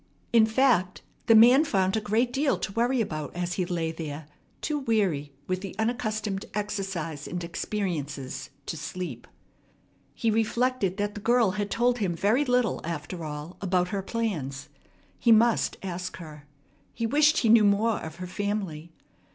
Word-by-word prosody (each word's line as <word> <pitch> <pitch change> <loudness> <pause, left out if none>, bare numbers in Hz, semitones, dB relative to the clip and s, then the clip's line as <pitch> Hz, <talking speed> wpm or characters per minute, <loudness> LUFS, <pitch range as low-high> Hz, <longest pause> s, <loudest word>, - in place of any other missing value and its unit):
In 225 -2 +6
fact, 220 -6 +2 0.2
the 225 - +7
man 245 +6 +8
found 190 -9 +1
a 220 - 0
great 225 +4 +1
deal 275 +1 +1
to - - -4
worry 240 +4 +1
about 155 -8 -4
as 175 0 -2
he 180 -1 -1
lay 165 -3 -1
there, 155 -2 -6 0.3
too 300 -1 -2
weary 195 - 0
with 185 0 -2
the 195 -2 -7
unaccustomed 215 -3 -1
exercise 195 -8 -3
and 175 0 -4
experiences 165 -7 -4 0.2
to - - -4
sleep. 155 -6 -6 0.9
He 225 - +1
reflected 225 -2 0
that 205 0 -1
the 205 - -7
girl 235 -2 +3
had 205 +1 -3
told 245 +2 +1
him 185 -5 0
very 210 +10 +2
little, 250 -3 +1
after 165 +1 -5
all, 150 +3 -6
about 180 -2 +1
her 200 0 -2
plans. 175 - -3 0.5
He 235 - +4
must 230 +1 +4
ask 185 -1 -5
her. 150 -4 -11 0.5
He 230 - -2
wished 300 +6 +4
he 230 - +2
knew 225 -1 +7
more 210 +2 +3
of 160 -1 -7
her 180 +1 -6
family. 185 -4 -3
200 Hz, 160 wpm, -27 LUFS, 170-230 Hz, 0.9 s, man